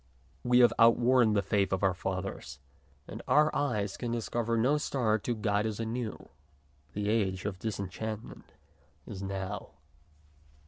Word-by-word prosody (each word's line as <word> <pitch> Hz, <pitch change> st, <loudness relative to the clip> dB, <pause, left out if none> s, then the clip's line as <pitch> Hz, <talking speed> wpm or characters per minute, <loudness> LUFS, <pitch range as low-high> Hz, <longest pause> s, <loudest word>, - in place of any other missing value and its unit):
We 125 Hz, 0 st, +5 dB
have 120 Hz, -, +6 dB
outworn 120 Hz, 0 st, +5 dB
the 100 Hz, -1 st, +2 dB
faith 100 Hz, 0 st, +1 dB
of 95 Hz, +1 st, -1 dB
our 95 Hz, -1 st, +3 dB
fathers, 95 Hz, -8 st, -5 dB, 0.5 s
and -, -, -7 dB
our 150 Hz, +1 st, +4 dB
eyes 105 Hz, -9 st, -1 dB
can 120 Hz, -2 st, -3 dB
dis 115 Hz, -2 st, -3 dB
cover 115 Hz, -1 st, 0 dB
no 135 Hz, +6 st, +3 dB
star 115 Hz, -7 st, 0 dB
to 120 Hz, +3 st, -2 dB
guide 105 Hz, 0 st, 0 dB
us 110 Hz, -1 st, -4 dB
anew. 115 Hz, -1 st, -4 dB, 0.7 s
The 100 Hz, 0 st, -2 dB
age 100 Hz, -4 st, 0 dB
of 100 Hz, -3 st, -3 dB
disenchantment 110 Hz, +1 st, -5 dB, 0.5 s
is 95 Hz, -2 st, -7 dB
now. 95 Hz, -1 st, -5 dB
110 Hz, 145 wpm, -30 LUFS, 100-120 Hz, 0.7 s, have